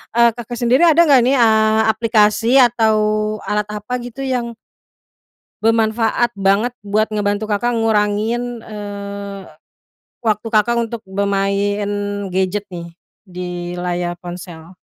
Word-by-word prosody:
eee, 235 0 +6
Kakak 240 +1 -6
sendiri 250 +7 +3
ada 330 0 +5
nggak 275 -6 +5
nih, 270 +2 +3
eee, 220 -2 +4
aplikasi 220 +2 +2
atau 230 -3 +3 0.5
alat 210 0 -1
apa 210 +3 -6
gitu 245 +2 -8
yang 245 -3 -2 1.1
bermanfaat 225 +1 +1
banget 200 +5 +2
buat 205 +2 +1
ngebantu 205 0 -1
Kakak 220 +3 -1
ngurangin, 225 +2 0
eee, 200 -2 -7 0.8
waktu 215 0 0
Kakak 235 +2 +2
untuk 230 -1 -4
bermain 200 +1 -1 0.4
gadget 190 +2 -1
nih 170 -1 -8 0.3
di 175 -1 -6
layar 175 0 -3
ponsel? 175 -1 -10
215 Hz, 115 wpm, -18 LUFS, 200-235 Hz, 1.1 s, eee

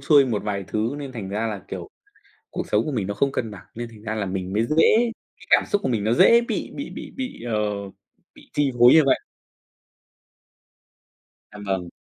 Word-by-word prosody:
xuôi 140 0 +5
một 110 -4 -1
vài 100 -2 -3
thứ, 110 +5 -1
nên 140 -2 -6
thành 105 -6 -6
ra 105 +3 -1
là, 105 -4 -5
kiểu, - - -6 0.6
cuộc - - -4
sống 105 +2 +3
của 155 - -2
mình 105 -7 -2
nó 100 - -2
không 140 +6 +1
cân 115 -5 -3
bằng, 95 -2 -11
nên 120 +1 -5
thành 110 -2 -15
ra 110 0 -4
là 105 - -1
mình 95 0 -4
mới 110 +2 +2
dễ 220 - +4 0.3
cái - - -16
cảm - - +6
xúc 205 - 0
của 130 - -1
mình 110 -4 0
nó 110 - +2
dễ 235 - +6
bị 235 - -3
bị - - -5
bị - - -8
bị, 255 - -5
ờ, 120 -2 -3 0.8
bị - - -18
chi 145 -2 +1
phối 120 +1 +8
như 160 - +8
vậy. 135 - +4 2.3
Em 105 0 -10
vâng. 95 -3 -2
115 Hz, 215 wpm, -23 LUFS, 105-140 Hz, 2.3 s, phối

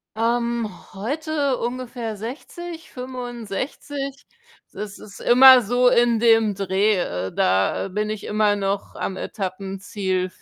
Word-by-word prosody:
Ähm, 235 0 0 0.2
heute 285 +5 -1
ungefähr 240 -2 -4
60, 320 - -8
65. 250 +1 -6 0.7
Das 205 -1 -7
ist 200 - -12
immer 255 +1 +8
so 245 +4 +3
in 240 -2 +4
dem 225 -2 +4
Dreh, 195 +2 +1
äh, 95 - -3
da 95 - +1
bin 210 +3 -2
ich 215 - -5
immer 210 -1 +2
noch 200 0 -2
am 190 - -4
Etappenziel. 190 -1 -3
225 Hz, 115 wpm, -23 LUFS, 195-250 Hz, 0.7 s, immer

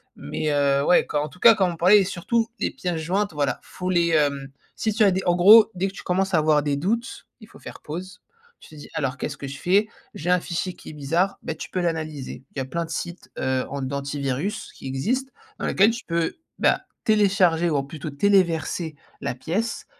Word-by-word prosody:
mais, 150 - -3
heu, 140 -1 +2
ouais 180 - +4
quand 145 - -1
en 150 - -5
tout 160 - -17
cas 230 +3 +8
comme 195 -4 +1
on - - -10
parlait 195 +5 +6
surtout 200 +5 -1
les - - 0
pièces 180 -3 -3
jointes 185 +4 -1
voilà 145 -2 -1
faut 185 0 -5
les, 170 -2 +3
hem, 145 -4 +1 0.3
si 220 - -1
tu 215 +1 +2
as 200 - +5
des 185 +1 0
en 175 - +4
gros 210 +6 +8
dès 185 +2 0
que 195 - -7
tu - - -9
commences 190 +1 -1
à 165 - +5
avoir 150 -1 +3
des 145 -1 0
doutes, 225 +10 -2
il 215 - -13
faut - - -17
faire - - -10
pause, 180 +4 -7 0.4
tu - - -16
te 155 - -14
dis: 145 - -11
«Alors 135 -2 -1
qu'est-ce 150 - -4
que - - -7
je 135 +1 -7
fais? 200 +6 +3 0.3
J'ai 175 +4 -1
un 180 - +4
fichier 175 +2 -3
qui - - -13
est - - -9
bizarre», 165 +7 0
ben 160 - -4
tu - - -8
peux 185 - -2
l'analyser. 155 -7 -3
Il - - -9
y - - 0
a - - -3
plein 170 +5 -3
de - - -14
sites, 175 +1 -6
heu, 130 -1 0
an 140 0 -4
d'antivirus 140 +5 -3
qui - - -9
existent 245 - -2 0.3
dans - - -2
lesquels 200 +4 +4
tu 235 +2 -6
peux, 170 -1 -1 0.2
bah, - - +2 0.2
télécharger 190 -6 +3
ou 145 -3 0
plutôt 150 +2 -7
téléverser 165 -1 +1 0.3
la 140 -3 -3
pièce 200 - -3
170 Hz, 230 wpm, -24 LUFS, 145-190 Hz, 0.4 s, cas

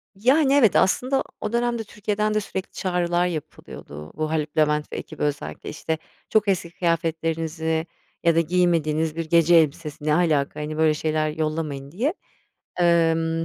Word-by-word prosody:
Yani, 265 +7 +3
evet, 255 -8 +5
aslında 255 +8 +2 0.2
o 215 - -3
dönemde 235 -1 0
Türkiye'den 210 0 -2
de 215 - +2
sürekli 190 -2 -5
çağrılar 175 -2 0
yapılıyordu. 75 - -8
Bu 155 0 -2
Haluk 155 -1 -2
Levent 150 -1 +2
ve - - -4
ekibi - - -6
özellikle. 145 -1 -3
İşte, 160 +1 -3 0.3
"Çok 215 -1 +2
eski 180 -3 0
kıyafetlerinizi 165 -1 -1 0.4
ya 170 -1 +4
da - - +5
giymediğiniz 160 -2 +1
bir 165 0 -3
gece 170 +1 +5
elbisesi 155 -1 +1
Ne 155 - +3
alaka? 155 -5 +1
Hani, 150 +1 -4
böyle 160 -1 +4
şeyler 155 0 0
yollamayın." 155 -3 -3
diye. 245 - 0 0.7
Emm, 165 -1 +2
165 Hz, 150 wpm, -23 LUFS, 155-180 Hz, 0.7 s, evet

